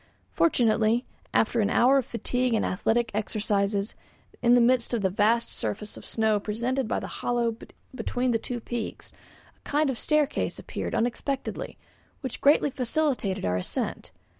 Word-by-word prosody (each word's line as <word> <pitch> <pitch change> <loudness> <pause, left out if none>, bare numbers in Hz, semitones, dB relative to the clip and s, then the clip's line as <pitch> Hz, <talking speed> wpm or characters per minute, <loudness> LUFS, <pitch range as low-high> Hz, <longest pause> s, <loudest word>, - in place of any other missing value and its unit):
Fortunately, 230 -5 +2 0.3
after 230 +1 +2
an 205 - +2
hour 260 +4 +5
of 260 - -4
fatigue 245 0 0
and 220 - +1
athletic 225 +5 0
exercises, 205 -1 -1 0.5
in 240 +1 +5
the - - +6
midst 240 0 +3
of 220 - -2
the 190 - +2
vast 220 +4 +2
surface 110 - -4
of - - -11
snow 220 -2 +1
presented 235 +5 -1
by - - 0
the - - -6 0.2
hollow 235 -2 0 0.4
between 255 -1 -1
the 225 - +1
two 245 +2 -4
peaks, 235 -1 -5 0.4
a - - -33
kind 295 -1 +1
of 240 - -6
staircase 300 -1 +1
appeared - - -4
unexpectedly 260 +3 -2 0.4
which 260 -3 -5
greatly 290 0 +4
facilitated 255 - 0
our 90 0 +1
ascent. 90 - -3
235 Hz, 155 wpm, -27 LUFS, 215-255 Hz, 0.5 s, the